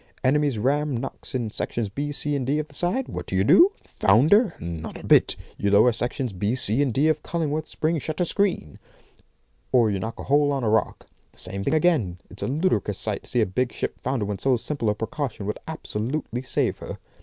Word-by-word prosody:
Enemy's 140 -1 +2
ram 140 +4 +1
knocks 135 +2 -6
in 115 -4 -2
sections 115 0 -2
B, 145 +9 -4
C, 145 0 0
D 135 +3 0
of 155 0 -2
the - - -17
side. 180 - 0
What - - -6
do - - -3
you 95 - +3
do? 355 - +6
Founder? 155 - +3
Not 85 -2 -6
a - - -10
bit; - - +5 0.2
you 100 - +1
lower 105 +5 +6
sections 120 0 -2
B, 100 +6 -1
C, 125 0 +2
and 140 -3 +1
D 140 +7 +2
of 155 -1 +1
Cullingworth's 155 -2 -2
spring 160 +1 0
shutter 155 +5 -2
screen. 180 - -1 0.9
Or 120 -4 +4
you 100 - -1
knock 110 +4 -5
a - - -5
hole 145 +1 +3
on 135 -2 -1
a 110 - +1
rock. 110 - 0 0.3
The - - -23
same 100 0 -3
thing 140 - +1
again. 150 - +2
It's 95 - -6
a - - -1
ludicrous 145 - 0
sight - - -3
to - - -5
see 120 - +2
a - - +4
big 120 +6 -1
ship - - -4
founder 130 -4 -1
when 100 -1 -4
so 130 +2 +2
simple 120 -2 -2
a 105 - +1
precaution 115 -1 -4
would 105 - -3
absolutely 125 -3 -3
save 130 - -1
her. - - -7
130 Hz, 215 wpm, -24 LUFS, 105-150 Hz, 0.9 s, do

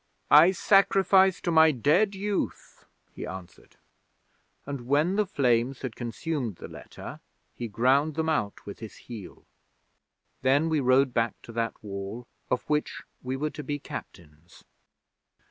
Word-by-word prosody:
'"I 155 +4 +9
sacrifice 195 -1 +4
to 175 - -1
my 160 -1 +7
dead 150 - +2
youth," 200 0 -4 0.3
he - - -8
answered, 95 -2 -10 0.9
and, 135 -4 -6
when 150 +7 +2
the 210 -1 +1
flames 125 -3 +1
had 125 -4 -4
consumed 120 - -3
the - - -9
letter, - - -10 0.3
he 120 - -5
ground 130 +8 +2
them 160 0 -1
out 130 -11 -1
with 100 - -8
his 110 -2 -9
heel. 110 -7 -11 1.0
Then 140 +5 +3
we 160 -2 +1
rode 130 0 +3
back 115 -1 0
to - - -10
that 115 0 -2
Wall 100 +3 -6 0.2
of 125 - -1
which 150 0 -1 0.2
we 130 +1 -3
were 150 +2 -2
to - - -7
be 145 +2 -3
Captains.' 80 - -11
135 Hz, 145 wpm, -27 LUFS, 115-160 Hz, 1.0 s, I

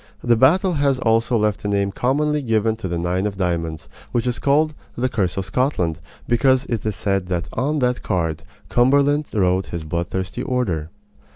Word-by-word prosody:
The 120 -1 +4
battle 175 - +4
has 140 -3 +2
also 115 -1 +2
left 105 -2 0
a - - -2
name 100 -1 +1
commonly 150 +6 0
given 110 -3 +1
to 110 - -5
the 85 -1 -2
nine 90 +4 0
of 100 -2 -6
diamonds, 85 -4 -2 0.2
which 120 -1 0
is 125 -1 -1
called 155 +2 +2 0.2
"the 125 +2 +1
curse 95 -7 -1
of 95 - -1
Scotland," 95 - 0 0.3
because 130 +2 +3
it 115 -4 -3
is 110 -2 -2
said 95 -4 -1
that 90 -2 -2
on 145 +5 0
that 125 0 -1
card 80 -6 -1 0.3
Cumberland 140 +4 +3
wrote 95 -2 +1
his 85 -2 -5
bloodthirsty 90 +6 -3
order. 105 - -1
110 Hz, 180 wpm, -21 LUFS, 95-130 Hz, 0.3 s, The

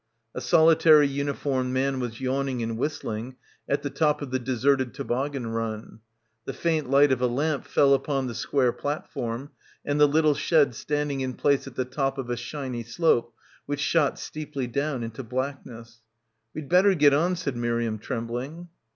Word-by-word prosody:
A - - -5
solitary 160 -2 +6
uniformed 140 -2 -2
man 135 0 0
was 120 -2 -4
yawning 130 -1 -1
and 115 0 -3
whistling 120 -2 -4 0.3
at 140 - 0
the 145 - -2
top 150 +1 +1
of 135 - -7
the 130 - 0
deserted 130 +1 0
toboggan 135 0 -2
run. 115 -1 -4 0.5
The - - -4
faint 160 -5 -1
light 140 +1 +5
of 130 -1 +1
a 125 - +3
lamp 145 +4 -1
fell 140 -1 +4
upon 135 0 0
the 125 - -4
square 125 +1 +1
platform 140 -3 -4 0.3
and 145 +1 0
the 150 - +8
little 155 +1 +3
sled 150 -2 +2
standing 145 +2 -2
in 130 -1 -3
place 140 -1 +1
at 130 - -10
the 130 - -1
top 135 +1 -2
of 125 -2 -4
a - - 0
shiny 125 0 -5
slope 120 0 +1 0.4
which 145 0 -2
shot 150 -1 +2
steeply 150 -3 -5
down 140 +1 -2
into 115 +3 -6
blackness. 125 -2 -6 0.5
"We'd 155 -2 -6
better 190 +4 +5
get 145 -3 +5
on," 170 +6 +2
said 145 -7 -3
Miriam 115 -2 -1
trembling. 130 +9 -5
135 Hz, 170 wpm, -26 LUFS, 125-145 Hz, 0.5 s, the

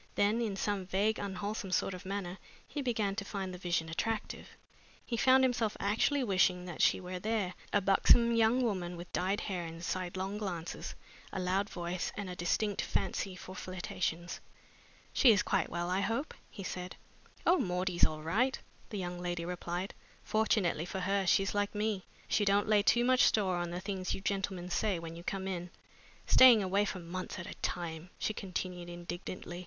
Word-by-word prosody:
Then 210 +3 +3
in 215 -4 -1
some 195 -1 -1
vague, 205 +4 +1
unwholesome 200 0 -3
sort 195 - +1
of 185 0 -8
manner 195 -2 -4 0.3
he 295 - -4
began 220 -6 0
to 205 - -1
find 195 -2 -4
the 180 - -7
vision 170 -2 0
attractive. 215 +7 -3 0.6
He 240 - -2
found 260 +3 +5
himself 240 -4 +1
actually 225 +7 +2
wishing 185 -4 +2
that 175 -3 -5
she - - +5
were 180 0 -5
there 210 -2 -1 0.2
a 205 - +3
buxom 235 +4 +5
young 230 +3 +4
woman 180 -6 -1
with 175 +1 -9
dyed 190 +3 0
hair 185 -4 -3
and 165 +1 -7
sidelong 185 +3 -2
glances, 175 -5 -4 0.4
a - - -3
loud 190 +3 0
voice, 175 0 -3
and 200 -3 -4
a - - -6
distinct 195 +4 0
fancy 195 -2 -1
for 185 0 -9
flirtations. 180 -2 -3 0.7
"She 250 - +7
is 200 - +4
quite - - +1
well, 175 +1 -2
I 185 - +2
hope?" 230 +9 -1 0.2
he 195 - -8
said. 180 -1 -5 0.5
"Oh, 355 +1 +5
Maudie's 180 -1 0
all 155 0 +3
right!" 235 +11 +2 0.3
the 210 - -4
young 180 -2 -4
lady 175 -1 -2
replied. 180 +1 -3 0.3
"Fortunately 210 -7 +1
for 190 +1 -4
her, 195 0 +1
she's 195 +2 +3
like 205 0 0
me 210 -2 -1 0.2
she 210 - +2
don't 200 +1 +3
lay 210 -1 +5
too 240 +3 +4
much 255 +1 +5
store 195 -8 +3
on 175 0 -2
the 175 +1 -4
things 190 -1 -2
you - - -7
gentlemen 190 -2 -2
say 205 0 +1
when 165 0 -7
you 170 - -9
come 190 +1 -3
in. 180 -2 -3 0.6
Staying 240 -5 +8
away 195 +2 +2
for 200 - -3
months 180 +1 -5
at 170 - -5
a - - -6
time!" 170 0 -3
she 215 - -1
continued 180 -3 -4
indignantly. 175 0 -6
190 Hz, 185 wpm, -33 LUFS, 180-210 Hz, 0.7 s, Staying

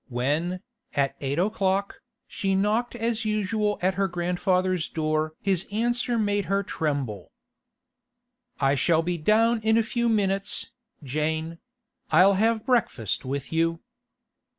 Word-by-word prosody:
When, 150 +9 -1 0.3
at 140 -1 +1
eight 140 +1 -2
o'clock, 195 +1 0 0.2
she 195 -1 -1
knocked 215 +5 0
as 230 -1 -1
usual 210 0 0
at 190 +1 +3
her 195 +1 0
grandfather's 180 0 0
door 155 0 -1
his 190 -2 +1
answer 240 +2 0
made 205 -2 0
her 195 +3 0
tremble. 140 - -3 1.3
'I 135 0 +3
shall 160 +3 +2
be 175 0 -2
down 225 +6 +3
in 220 +1 +3
a 230 - +3
few 235 +1 0
minutes, 195 -3 0 0.3
Jane; 160 +4 -2 0.5
I'll 185 +5 +6
have 220 +3 +1
breakfast 170 - 0
with 140 +3 -4
you. 165 0 +1
185 Hz, 130 wpm, -26 LUFS, 155-215 Hz, 1.3 s, I'll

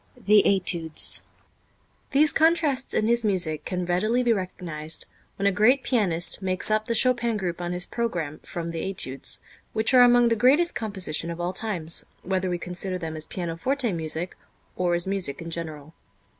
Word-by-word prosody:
The 210 -2 +4
Études. 170 -5 +2 0.9
These 290 +2 +4
contrasts 320 -5 +2
in 215 - +2
his 235 0 +3
music 175 -7 +3
can 180 -1 -3
readily 215 +8 +1
be 240 -1 +3
recognized 170 -5 -2 0.3
when 200 - -3
a 200 - +4
great 240 +8 +3
pianist 190 -8 +1
makes 185 +2 0
up 215 0 +1
the 230 - 0
Chopin 240 -2 +2
group 180 -3 -4
on 175 0 -3
his 180 0 -1
program 170 -11 -3
from 170 -1 -6
the 165 -1 -4
Études, 135 -9 -2 0.4
which 220 +4 +1
are 250 - +8
among 245 -1 +6
the 230 - +2
greatest 280 +10 +3
compositions 190 -6 -3
of 170 - -7
all 175 +1 -2
times, 180 -6 -1 0.2
whether 185 0 -1
we 175 - -1
consider 180 +2 -3
them 160 -2 -6
as 155 0 -2
pianoforte 200 +9 -2
music 160 +1 -3 0.4
or 175 -1 +1
as 175 - -3
music 190 -7 -1
in 165 0 -7
general. 160 -2 -6
185 Hz, 170 wpm, -25 LUFS, 170-230 Hz, 0.9 s, are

